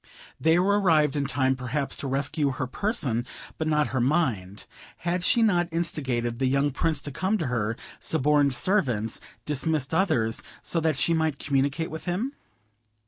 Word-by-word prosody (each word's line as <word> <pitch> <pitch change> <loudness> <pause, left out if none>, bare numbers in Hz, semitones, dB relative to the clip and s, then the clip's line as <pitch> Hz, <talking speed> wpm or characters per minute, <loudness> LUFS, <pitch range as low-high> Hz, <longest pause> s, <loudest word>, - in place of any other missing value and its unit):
They 160 +1 +4
were 200 +3 +3
arrived 155 -6 +3
in 145 -1 0
time 130 -1 +1
perhaps 130 +2 -3
to 140 - -4
rescue 140 +1 0
her 130 - -2
person, 130 - -1 0.4
but 160 - -1
not 150 -1 +2
her 130 - +1
mind; 120 - 0 0.3
had 175 +1 -2
she 235 +4 +4
not 175 -5 +2
instigated 130 -8 -2
the 135 - +2
young 140 +2 +2
Prince 155 +1 -1
to 145 - -5
come 190 +9 0
to 165 - -2
her; 115 -3 -1 0.2
suborned 145 -2 +2
servants, 120 - +1 0.2
dismissed 150 0 -1
others, 155 - +1 0.2
so 170 - 0
that 160 -3 +1
she 140 +6 +2
might 160 -3 +1
communicate 140 +4 0
with 160 - -7
him? 205 +11 -2
145 Hz, 165 wpm, -26 LUFS, 130-165 Hz, 0.4 s, They